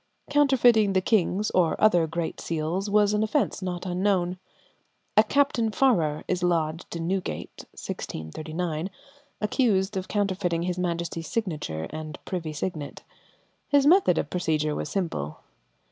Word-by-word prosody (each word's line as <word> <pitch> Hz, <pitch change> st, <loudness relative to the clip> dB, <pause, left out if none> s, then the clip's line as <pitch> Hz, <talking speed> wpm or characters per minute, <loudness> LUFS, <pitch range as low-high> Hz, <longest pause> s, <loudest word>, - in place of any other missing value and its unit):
Counterfeiting 245 Hz, -8 st, +4 dB
the 190 Hz, -, +4 dB
king's 205 Hz, 0 st, +1 dB
or 175 Hz, -3 st, +2 dB
other 175 Hz, -7 st, +4 dB
great 165 Hz, +1 st, -3 dB
seals 170 Hz, +5 st, -2 dB
was 210 Hz, 0 st, +4 dB
an 210 Hz, -, +2 dB
offence 220 Hz, +1 st, 0 dB
not 180 Hz, -1 st, -4 dB
unknown. 185 Hz, -1 st, 0 dB, 0.8 s
A -, -, +7 dB
Captain 275 Hz, -5 st, +2 dB
Farrar 175 Hz, -, +2 dB
is 180 Hz, -1 st, -1 dB
lodged 170 Hz, -1 st, -1 dB
in 165 Hz, -1 st, -3 dB
Newgate 190 Hz, 0 st, -4 dB
(1639), 155 Hz, -, -4 dB, 0.5 s
accused 210 Hz, -3 st, +1 dB
of 190 Hz, -1 st, -3 dB
counterfeiting 190 Hz, -4 st, 0 dB
his 180 Hz, 0 st, -2 dB
Majesty's 170 Hz, -2 st, -2 dB
signature 155 Hz, -, -3 dB
and 155 Hz, 0 st, -6 dB
privy 170 Hz, -4 st, -3 dB
signet. 155 Hz, -1 st, -5 dB, 0.6 s
His 285 Hz, -1 st, +4 dB
method 325 Hz, -, +5 dB
of 150 Hz, -, -2 dB
procedure 155 Hz, -4 st, 0 dB
was 150 Hz, -, -3 dB
simple. 145 Hz, -, -3 dB
180 Hz, 130 wpm, -26 LUFS, 160-210 Hz, 0.8 s, A